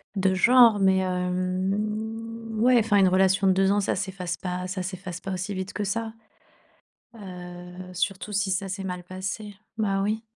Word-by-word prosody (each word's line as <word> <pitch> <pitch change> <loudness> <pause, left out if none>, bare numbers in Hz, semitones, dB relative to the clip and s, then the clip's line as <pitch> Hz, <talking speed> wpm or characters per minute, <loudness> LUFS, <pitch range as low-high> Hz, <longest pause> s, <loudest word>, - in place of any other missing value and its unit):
de 190 -1 +2
genre. 235 +2 +6
Mais 190 -1 +4
hem, 210 +5 -2
ouais, 245 +2 +5
enfin 215 -2 +2
une 195 -1 +6
relation 190 +1 +3
de - - +6
2 195 +1 +3
ans, 205 - +3
ça 200 - 0
s'efface 185 -2 -4
pas, 180 -1 -4
ça 185 0 -3
s'efface 185 -1 -6
pas 195 - -5
aussi 185 +2 -3
vite 190 0 -5
que 210 - -2
ça. 225 +2 -2 1.0
Heu, 180 -2 -9
surtout 195 +2 -2
si 195 -1 0
ça 190 +1 -1
s'est 195 +1 -4
mal 180 -1 -4
passé. 195 +3 -5 0.2
Bah 195 -3 +1
oui. 215 +2 -1
195 Hz, 175 wpm, -26 LUFS, 185-210 Hz, 1.0 s, genre